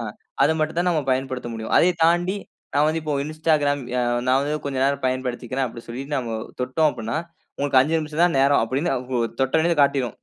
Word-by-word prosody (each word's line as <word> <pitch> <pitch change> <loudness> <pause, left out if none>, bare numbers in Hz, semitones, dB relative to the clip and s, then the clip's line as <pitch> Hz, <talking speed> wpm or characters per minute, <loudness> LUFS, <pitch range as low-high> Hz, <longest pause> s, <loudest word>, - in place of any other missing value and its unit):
அ, - - -3 0.4
அத - - +5
மட்டும் 155 +2 -1
தான் 180 - +2
நாம 160 -4 +1
பயன்படுத்த 130 -1 -2
முடியும். 110 -1 -5
அதைத் 175 -1 +4
தாண்டி, 175 +3 +3 0.4
நான் 145 +1 +4
வந்து 160 +1 0
இப்போ 150 -1 -2
Instagram 155 -2 +1
ய 125 - 0 0.3
"நான் 130 +1 +4
வந்து 145 +2 -1
கொஞ்சம் 135 -2 -1
நேரம் 140 0 0
பயன்படுத்திக்கிறேன்" 130 0 -2
அப்படின்னு 115 -1 -10
சொல்லி, 120 +3 -5
நாம 120 -5 -2 0.3
தொட்டோம் 130 +5 +2
அப்படினா, 115 -2 -4 0.4
உங்களுக்கு 140 -2 +3
5 150 +5 +1
நிமிஷம் 155 +1 -1
தான் 175 -3 +2
நேரம் 140 +1 +4
அப்படின்னு 135 +9 -1 0.5
தொட்டனே 160 +6 +2
காட்டிடும். 135 -4 +1
140 Hz, 190 wpm, -23 LUFS, 130-155 Hz, 0.5 s, அத